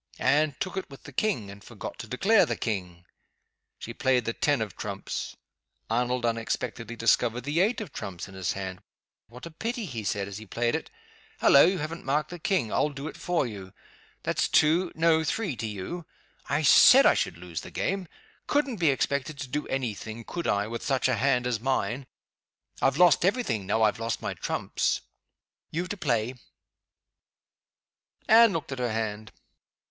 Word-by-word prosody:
Anne 150 0 +2
took 185 - -3
it 190 - -4
with 135 - -13
the 145 - -10
King, 125 - -1
and 100 +1 -13
forgot 110 0 -8
to 125 - -6
declare 195 - +4
the - - -1
King. 90 -6 -4 0.7
She 115 - -7
played 125 -1 +1
the 115 - -1
ten 145 +1 +1
of 110 -5 -4
Trumps. 100 -1 -5 0.5
Arnold 125 +1 0
unexpectedly 115 0 -2
discovered 115 +1 +2
the 145 +6 -1
eight 215 +6 +2
of 190 -9 -8
Trumps 90 -2 -6
in 95 - -13
his 95 -1 -2
hand. 95 -1 -6 0.5
"What 125 +6 -11
a 170 - -8
pity!" 225 +7 -3
he 115 - -5
said, 100 -1 -1
as 100 +1 -7
he 110 - -11
played 120 +4 0
it. - - -3 0.5
"Hullo! 140 - +7
you 185 +1 +1
haven't 160 +1 -5
marked 150 +4 0
the 175 - -7
King! 160 - 0
I'll 150 - +2
do 140 +1 -7
it - - -7
for 175 -5 0
you. 100 -5 -8 0.5
That's - - +1
two 165 +4 +3
no, 160 0 +3
three 170 - -1
to 110 - -3
you. 110 - -6 0.4
I - - +1
said - - +8
I - - +7
should 85 - -1
lose 85 -2 -6
the - - -9
game. 195 -1 -2 0.4
Couldn't 280 -5 +1
be 165 -4 +3
expected 140 +1 -1
to 135 - -5
do 145 +3 -3
any 130 -5 -1
thing 110 +3 -8
(could 170 +8 -4
I?) 100 0 +1
with 115 +2 -5
such 135 -3 +1
a - - +2
hand 125 +1 +2
as 120 -3 0
mine. 130 +1 -1 0.7
I've - - +2
lost 175 -1 +5
every 205 +8 +2
thing 110 - -2
now 110 +2 +2
I've 110 0 +2
lost 115 0 -2
my - - -3
trumps. - - -1 0.7
You 170 +3 -2
to 195 - -4
play." 125 - 0 1.9
Anne 230 0 +7
looked 160 -3 -4
at 135 - -4
her 120 -2 0
hand. 110 -1 -3
125 Hz, 185 wpm, -27 LUFS, 110-160 Hz, 1.9 s, said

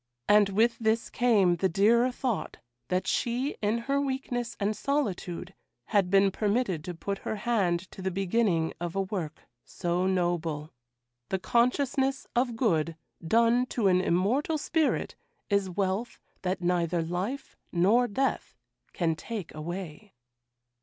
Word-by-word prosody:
And 205 -1 +5
with 230 +4 +2
this 225 0 0
came 205 -8 +3
the 190 +2 +1
dearer 235 +7 +4
thought 245 -4 -3 0.3
that 185 +1 0
she 245 +8 0
in 210 +2 +1
her 275 +4 0
weakness 260 -3 -3
and 210 +1 0
solitude 195 -8 -2 0.4
had 195 -3 +3
been 195 0 +4
permitted 205 -5 0
to 180 - -5
put 200 +4 -4
her - - -3
hand 200 -6 +1
to - - -10
the 190 - -1
beginning 190 -3 +1
of 175 0 -3
a 195 - +1
work 185 -6 -4 0.2
so 175 +1 -1
noble. 170 -5 -1 0.6
The 190 - 0
consciousness 265 +6 +1
of 240 -1 +1
good 165 - +1 0.3
done 230 +7 +3
to 230 -5 0
an 180 0 +4
immortal 215 - +1
spirit 315 0 0 0.4
is 200 -1 +2
wealth 195 +5 -2 0.2
that 185 0 -2
neither 175 -1 +1
life 185 +11 -4 0.2
nor 205 +8 +4
death 270 +6 -1 0.4
can 165 -3 0
take 200 +2 -6
away. 175 +4 -7
200 Hz, 140 wpm, -28 LUFS, 180-235 Hz, 0.6 s, And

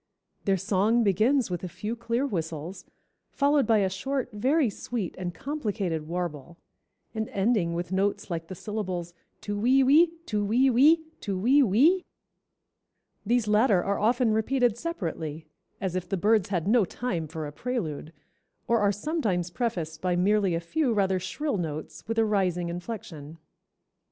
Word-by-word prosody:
Their 195 -1 +2
song 205 +5 +2
begins 220 +4 +2
with 175 0 -3
a - - -2
few 215 +6 -4
clear 235 +3 -1
whistles, 170 - -4 0.4
followed 285 0 +2
by 225 -2 +4
a 195 - +2
short, 265 +5 -3
very 265 +7 +2
sweet, 210 -2 -4
and 180 -1 -4
complicated 200 - -3
warble, 170 -2 -4 0.6
and 220 -1 -3
ending 195 -4 +1
with 175 +1 -4
notes 195 0 -1
like 165 -1 -3
the 185 - -7
syllables 185 -4 -4 0.3
tu 205 - -4
we 260 +5 +4
we, 300 +6 +6 0.2
tu 210 -6 -1
we 245 +6 +3
we, 305 +7 +5 0.2
tu 195 -2 -3
we 255 +9 +4
we. 280 - +4 1.2
These 235 -1 +2
latter 210 -3 +4
are 200 0 -1
often 230 +1 +2
repeated 245 +1 +2
separately, 165 - -4 0.3
as 190 -2 -3
if 185 -1 -3
the 195 - 0
birds 210 +1 +2
had 180 -3 -1
no 225 +1 +4
time 180 -4 -3
for 155 0 -5
a 145 - -6
prelude, 160 - -4 0.6
or 235 0 +3
are 205 -1 +3
sometimes 205 - -1
prefaced 170 -9 -3
by 180 -1 +1
merely 195 0 +2
a - - 0
few 255 - 0
rather 190 -2 +2
shrill 290 - -2
notes 155 +1 -6
with 225 0 -2
a 225 - +4
rising 180 -5 0
inflection." 170 -5 -7
205 Hz, 160 wpm, -27 LUFS, 175-240 Hz, 1.2 s, we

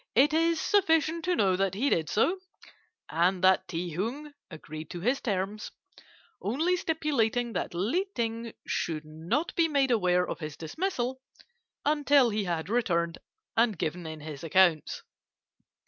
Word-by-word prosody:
"It 280 +6 +5
is 330 +1 +2
sufficient 325 -4 +2
to 360 0 +2
know 190 - +3
that 190 0 0
he 265 +8 +1
did 160 -2 +1
so, 345 - +2 0.7
and 180 +3 +1
that 190 0 +4
Ti 175 0 -3
Hung 260 - -4 0.2
agreed 155 -2 -9
to 175 - -6
his 245 +8 +1
terms, 205 0 -2 0.7
only 310 - +1
stipulating 250 -9 0
that 180 -1 -3
Li 260 - 0
Ting 230 0 -2
should 155 -2 -2
not 165 - -2
be 335 -1 +3
made 280 -4 +2
aware 180 -5 +2
of - - -5
his 155 -2 -6
dismissal 260 - -3 0.6
until 285 -4 +4
he 210 -1 -1
had 170 -2 -2
returned 170 -7 0 0.4
and 225 -4 +3
given 165 +2 -3
in 155 -1 -7
his 150 -1 -8
accounts. 170 -1 +2
215 Hz, 145 wpm, -28 LUFS, 175-285 Hz, 0.7 s, It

